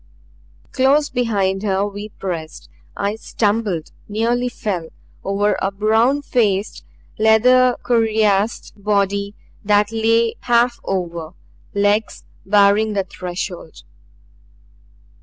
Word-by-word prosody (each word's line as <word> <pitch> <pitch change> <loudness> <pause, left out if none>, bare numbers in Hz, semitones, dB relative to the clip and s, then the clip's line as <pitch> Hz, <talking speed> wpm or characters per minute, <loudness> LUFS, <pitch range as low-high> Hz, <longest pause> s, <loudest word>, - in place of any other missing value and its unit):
Close 280 +3 +2
behind 200 -6 0
her 200 -1 0
we 205 +1 -7
pressed. 170 -6 -6 0.3
I 205 +2 -2
stumbled, 205 -7 -1 0.2
nearly 235 +4 0
fell, 185 -9 -4 0.3
over 205 +1 +1
a 195 - +1
brown 220 +8 +1
faced, 210 -6 0 0.4
leather 250 +3 +5
cuirassed 220 -2 +1
body 200 0 0 0.3
that 205 0 +2
lay 225 +1 +1
half 240 0 +2
over, 170 -3 -4 0.4
legs 205 +2 0 0.2
barring 205 +2 +4
the 195 -1 0
threshold. 180 -2 -7
210 Hz, 95 wpm, -19 LUFS, 195-230 Hz, 0.4 s, leather